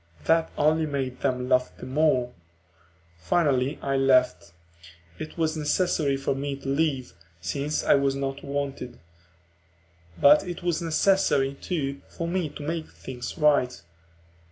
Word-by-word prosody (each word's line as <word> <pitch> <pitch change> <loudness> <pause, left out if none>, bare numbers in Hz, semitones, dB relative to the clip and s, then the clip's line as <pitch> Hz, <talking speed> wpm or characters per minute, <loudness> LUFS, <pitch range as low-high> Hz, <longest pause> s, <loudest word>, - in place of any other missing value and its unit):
That 165 0 +3
only 155 +1 +2
made 135 -3 -3
them 125 0 -1
laugh 125 -1 +1
the - - -9
more. 130 -3 +1 0.9
Finally 135 - +1
I 135 0 0
left; 130 -11 +2 0.7
it 155 - -7
was 160 -1 0
necessary 150 -2 +1
for 135 0 -1
me 140 +1 -3
to 135 - -10
leave, 135 - 0 0.3
since 140 - -2
I - - +5
was 140 -1 +2
not 135 0 -4
wanted. 140 -3 -4 1.2
But 145 +1 +7
it 175 -1 -7
was 175 -1 0
necessary, 165 -5 +2
too, 140 -2 -4
for 170 - -5
me 175 -2 -1
to 150 0 -9
make 160 +1 -3
things 125 -2 -8
right. 145 - +3
140 Hz, 135 wpm, -26 LUFS, 135-155 Hz, 1.2 s, But